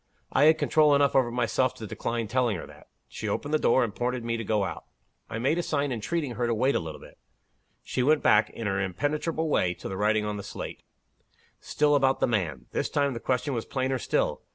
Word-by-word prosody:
I 145 - +4
had 160 +1 +6
control 150 -2 +4
enough 140 0 +3
over 130 -3 +4
myself 125 +1 0
to 115 - -8
decline 115 +2 -3
telling 120 -2 +1
her - - -7
that. - - -16 0.2
She - - -5
opened 145 +1 -3
the 155 - +3
door, 130 - +3
and 110 -4 -3
pointed 125 0 -1
to - - -9
me 115 0 -1
to 115 - -3
go 105 -1 +1
out. 95 - -5 0.4
I - - -4
made 135 +8 +1
a - - +2
sign 145 -4 -1
entreating 135 +5 -2
her 120 0 -1
to 115 - +1
wait 130 +5 +2
a - - +1
little. 80 -2 -7 0.8
She - - -2
went 150 +4 +3
back, 105 +1 +4
in 115 - -7
her 100 -1 0
impenetrable 150 - -1
way, 90 - +1
to - - -8
the 95 - -5
writing 105 +1 +2
on 105 0 -3
the 100 - -6
slate - - -7 0.8
still 150 0 +1
about 135 -2 +3
the - - +3
'man.' 85 - -1
This - - -1
time, 140 -1 +1
the 115 - -5
question 130 +4 -1
was 115 -3 -3
plainer 130 -1 -1
still. - - 0
125 Hz, 230 wpm, -27 LUFS, 105-140 Hz, 0.8 s, had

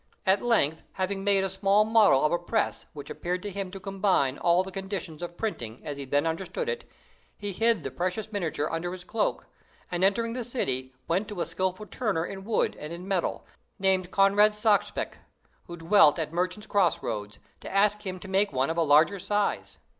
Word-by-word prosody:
At 190 +1 +4
length, 160 -10 +2
having 195 +1 -2
made 200 -1 +3
a 195 - 0
small 195 +2 +3
model 215 -11 +5
of 150 - +2
a 175 - +1
press 210 +5 -1
which 145 -2 -8
appeared 180 +1 -3
to 205 - -4
him 195 -1 -4
to 195 +1 -8
combine 190 -8 +1
all 175 +1 +3
the 190 - -8
conditions 190 -5 -5
of 175 0 -6
printing 120 - -4
as 145 - -4
he 140 - -6
then 145 +3 +1
understood 185 - -3
it, 475 0 -4 0.5
he 205 -1 -4
hid 225 -2 +2
the - - -4
precious 185 +5 -3
miniature 160 -7 -2
under 170 +2 -3
his 185 -1 -8
cloak, 210 +4 -1 0.5
and, 175 +1 -1
entering 230 +4 +2
the 250 0 -3
city, 130 - -2 0.2
went 190 +5 0
to 205 -4 -7
a - - 0
skillful 185 +4 -2
turner 205 -7 -1
in 195 +1 -7
wood 220 0 +1
and 150 - -7
in 175 +2 -7
metal, 190 -3 -1 0.3
named 190 -2 +1
Conrad 200 +2 +4
Sachspach, 210 -1 0 0.5
who 175 - -8
dwelt 165 -2 +5
at 160 -1 -3
Merchants' 180 +4 -2
Cross 195 -7 +2
roads, 105 -1 -4 0.2
to - - -8
ask 210 +1 +2
him 185 -2 -4
to - - -9
make 195 +2 +2
one 135 +3 0
of 165 - -4
a - - +3
large 155 +1 +5
size. 205 0 -1
190 Hz, 200 wpm, -27 LUFS, 165-205 Hz, 0.5 s, model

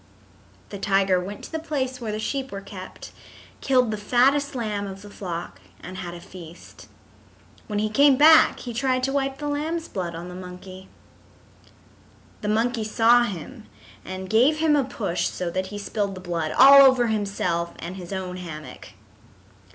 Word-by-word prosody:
The 200 - -7
tiger 195 -2 +2
went 195 +3 -7
to - - -9
the 320 - -3
place 260 -5 -3
where 220 -2 -3
the 210 - -3
sheep 270 +4 -3
were 200 - -5
kept, 195 -2 -10 0.5
killed 255 -4 +2
the 215 - -3
fattest 265 +7 +2
lamb 210 -4 -3
of 195 +1 -9
the 205 - -12
flock 170 - -6 0.2
and 185 +1 -9
had 175 -2 -6
a - - -9
feast. 175 -2 -13 0.8
When 210 - -3
he 215 +1 +1
came 275 +5 +4
back 315 +3 +6
he 240 - -6
tried 255 +1 0
to 270 - 0
wipe 270 -1 -1
the 295 - -5
lamb's 315 +3 -2
blood 175 -3 -5
on 170 +2 -7
the 180 - -9
monkey. 185 +1 -10 1.5
The 210 - -4
monkey 225 +2 0
saw 230 +3 +4
him 175 - -8 0.4
and 185 0 -7
gave 245 +10 +3
him 310 -1 +3
a 285 - +2
push 200 -8 -2
so 175 -2 -4
that 185 +2 -2
he 205 - -7
spilled 200 -1 -3
the - - -8
blood 170 -3 -3
all 275 +1 +9
over 260 -3 +5
himself 195 -6 -2
and 175 +2 -7
his 180 -1 -9
own 185 -1 -4
hammock. 160 -4 -9
205 Hz, 175 wpm, -24 LUFS, 185-260 Hz, 1.5 s, all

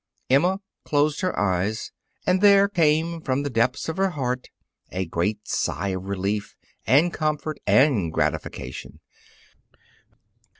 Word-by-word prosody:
Emma 180 +8 +3 0.2
closed 145 +2 +1
her 185 -1 -1
eyes 100 +2 -1 0.3
and 185 +1 +2
there 200 -1 +6
came 165 -2 +1
from 135 -1 -1
the 145 - -3
depths 120 +2 0
of 160 - -3
her 195 0 +2
heart 125 -6 -3 0.4
a 95 +1 -3
great 100 +6 -2
sigh 100 - -1
of 95 0 -4
relief, 100 +1 -2 0.3
and 155 +6 +4
comfort 155 0 -2
and 125 - +4
gratification. 65 -4 -3
135 Hz, 125 wpm, -24 LUFS, 100-160 Hz, 0.4 s, there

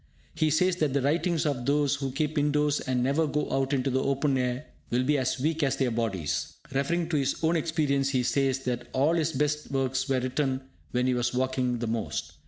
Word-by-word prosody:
He 155 - +1
says 180 +4 +2
that 155 -5 +1
the 140 - +2
writings 165 +3 +1
of 135 -4 -1
those 145 0 +2
who 135 -2 -3
keep 150 +3 -1
indoors 150 0 +2
and 125 -2 -1
never 145 +5 +2
go 150 +1 -1
out 135 0 +1
into 135 -1 +1
the 130 +1 +1
open 140 +1 +1
air, 125 +2 -1 0.2
will 125 +1 +1
be 150 +3 +2
as 130 0 -1
weak 160 +4 0
as 140 -2 +2
their 130 -3 +1
bodies. 110 -9 -2 0.2
Referring 160 +6 0
to 160 - +1
his 140 -1 +1
own 160 +2 +3
experience, 150 -4 +1
he 130 -2 +1
says 135 +1 +1
that 120 -1 -3
all 140 +5 +3
his 165 -1 +1
best 150 +1 -1
works 135 0 -1
were 135 -1 +2
written 130 +1 -1 0.3
when 125 0 0
he 130 - +2
was 120 0 0
walking 130 -1 0
the 120 - -3
most. 110 -11 -3
135 Hz, 215 wpm, -28 LUFS, 130-150 Hz, 0.3 s, own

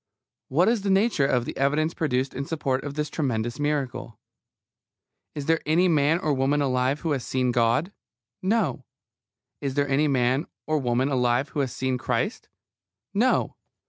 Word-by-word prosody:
What 165 +7 +2
is 230 -2 +2
the 200 - -2
nature 195 -7 +3
of 125 -3 +1
the - - -5
evidence 150 +4 +1
produced 135 -4 -1
in 135 - -3
support 135 -5 -1
of 145 -1 -6
this 150 0 -1
tremendous 120 -4 -2
miracle? 140 -6 -2 1.2
Is 145 -2 -4
there 165 +1 +2
any 170 +4 +3
man 155 -1 +3
or 155 -4 0
woman 135 +2 +1
alive 130 +1 +1
who 165 - -1
has 135 -4 -1
seen 130 -1 0
God? 120 - +1 0.5
No. 195 - 0 0.8
Is 135 -2 -3
there 145 0 +1
any 140 +2 +2
man 130 +2 +1 0.2
or 155 0 +1
woman 125 +1 +1
alive 125 0 +1
who 135 - -4
has 135 -3 0
seen 130 0 -2
Christ? - - -2 0.6
No. 235 +6 +1
140 Hz, 165 wpm, -25 LUFS, 130-155 Hz, 1.2 s, nature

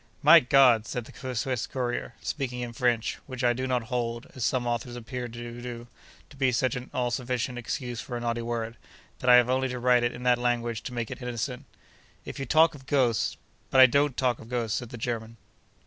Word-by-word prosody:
'My 160 +3 +9
God!' 125 -5 +5
said 120 -2 -4
the 130 +1 -7
Swiss 125 -1 -1
courier, 120 -1 -3
speaking 125 -4 -3
in 120 -1 -5
French, 120 -2 0
which 130 -2 -6
I 120 -1 +4
do 130 +2 -3
not 125 -2 0
hold 120 -1 -3
(as 130 - -5
some 125 0 +1
authors 120 0 -2
appear 120 +1 -5
to 120 0 -8
do) 120 -1 -7 0.5
to - - -13
be 135 -2 +2
such 130 +3 +1
an 125 0 -6
all 125 -1 -1
sufficient 125 0 -2
excuse 120 0 -4
for 120 - -5
a - - -4
naughty 120 0 -2
word, 115 0 -3 0.4
that 125 - 0
I 125 - +10
have 125 -1 +6
only 130 +1 +1
to 125 -1 -4
write 125 0 +4
it 120 0 0
in 125 - -8
that 125 -1 +3
language 120 -2 -1
to 125 - -5
make 115 -2 -3
it - - -7
innocent; 125 +2 -4 0.6
'if - - -7
you 135 - -4
talk 160 +1 +5
of 135 -2 -14
ghosts—' 130 -6 +1 0.3
'But 130 - +3
I 130 - +11
don't 140 +1 +2
talk 125 -2 +1
of 110 - -12
ghosts,' 120 -3 -1
said 120 - -8
the 120 - -8
German. 115 -1 -4
125 Hz, 225 wpm, -27 LUFS, 120-130 Hz, 0.6 s, I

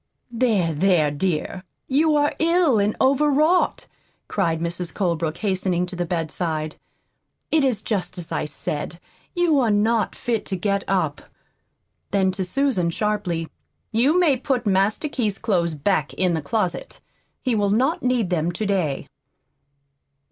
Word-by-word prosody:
"There, 220 -9 +1
there, 160 -2 +3
dear, 180 +3 -2 0.2
you 300 +3 +3
are 295 0 +2
ill 330 -7 +3
and 205 +1 +1
overwrought," 295 +5 +3 0.4
cried 165 -5 0
Mrs. 170 +1 -3
Colebrook, 170 -4 -1
hastening 185 -3 0
to 180 - -7
the 175 -1 -2
bedside. 160 -2 -2 0.8
"It 315 -2 +3
is 245 -6 +1
just 190 -4 -2
as 175 -2 -7
I - - -1
said, 150 +2 -4 0.4
you 345 -5 +3
are 240 -4 +2
not 215 +2 +1
fit 235 -3 -2
to 190 - -1
get 200 +2 0
up." 160 -7 0 0.9
Then, 190 -1 +2
to 190 0 -2
Susan, 205 -3 +1
sharply: 185 -4 -1 0.4
"You 265 +10 +3
may 310 -7 +4
put 250 -1 -1
Master 200 +8 +2
Keith's 220 -9 -1
clothes 170 -7 0
back 150 -1 0
in 180 -2 +1
the 160 - -1
closet. 185 +3 -2 0.4
He 255 - +1
will 205 -2 +1
not 260 +10 +1
need 245 -6 0
them 170 -1 +1
to 215 +5 -3
day." 180 -9 -1
195 Hz, 145 wpm, -23 LUFS, 170-245 Hz, 0.9 s, may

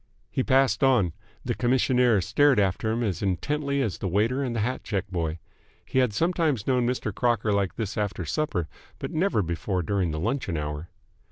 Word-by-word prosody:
He - - 0
passed 135 +1 +3
on. 120 -11 +3 0.3
The - - 0
commissionaire 125 -1 +3
stared 145 - +3
after 100 +2 +1
him 115 +2 -1
as 95 -7 -2
intently 140 - 0
as 110 -7 -3
the - - -2
waiter 110 +9 +1
and 125 -4 -2
the 110 - 0
hat 125 +4 -2
check 100 -1 -2
boy. 85 -3 -2 0.5
He 130 - 0
had 125 -3 +3
sometimes 160 - 0
known 125 -2 +2
Mr. 120 -4 -2
Crocker 115 -2 +1
like 100 -2 0
this 110 -1 -3
after 100 -4 -2
supper, 90 - -1 0.3
but - - -5
never 160 - +1
before 90 +2 -2
during 95 +1 0
the 80 0 -3
luncheon 110 - -1
hour. 75 +2 -4
110 Hz, 185 wpm, -26 LUFS, 95-130 Hz, 0.5 s, passed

